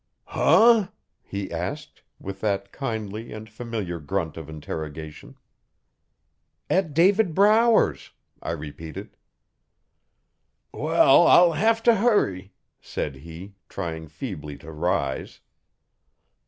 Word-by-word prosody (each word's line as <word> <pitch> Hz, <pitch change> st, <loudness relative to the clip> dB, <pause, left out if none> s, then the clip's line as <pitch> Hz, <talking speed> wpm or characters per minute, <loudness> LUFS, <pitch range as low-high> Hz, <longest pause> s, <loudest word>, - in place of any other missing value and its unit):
'Huh?' 225 Hz, -3 st, +4 dB, 0.3 s
he 100 Hz, -1 st, -6 dB
asked, 120 Hz, -, -5 dB, 0.2 s
with 95 Hz, 0 st, -8 dB
that 100 Hz, -2 st, -1 dB
kindly 110 Hz, -4 st, -5 dB
and 110 Hz, 0 st, -8 dB
familiar 110 Hz, -6 st, -5 dB
grunt 80 Hz, +1 st, -3 dB
of 80 Hz, -2 st, -9 dB
interrogation. 80 Hz, 0 st, -7 dB, 1.4 s
'At 165 Hz, -6 st, +1 dB
David 185 Hz, +1 st, +3 dB
Brower's,' 210 Hz, -, +3 dB, 0.3 s
I -, -, -5 dB
repeated. 80 Hz, 0 st, -8 dB, 1.6 s
'Well, -, -, +4 dB
I'll 175 Hz, -1 st, +7 dB
have 225 Hz, +7 st, +1 dB
t' 240 Hz, -, +6 dB
hurry,' 195 Hz, -, +1 dB, 0.3 s
said 70 Hz, -2 st, -5 dB
he, 85 Hz, +7 st, -11 dB, 0.2 s
trying 80 Hz, -1 st, -5 dB
feebly 75 Hz, -, -7 dB
to 80 Hz, +3 st, -11 dB
rise. 80 Hz, -4 st, -2 dB
100 Hz, 100 wpm, -24 LUFS, -, 1.6 s, I'll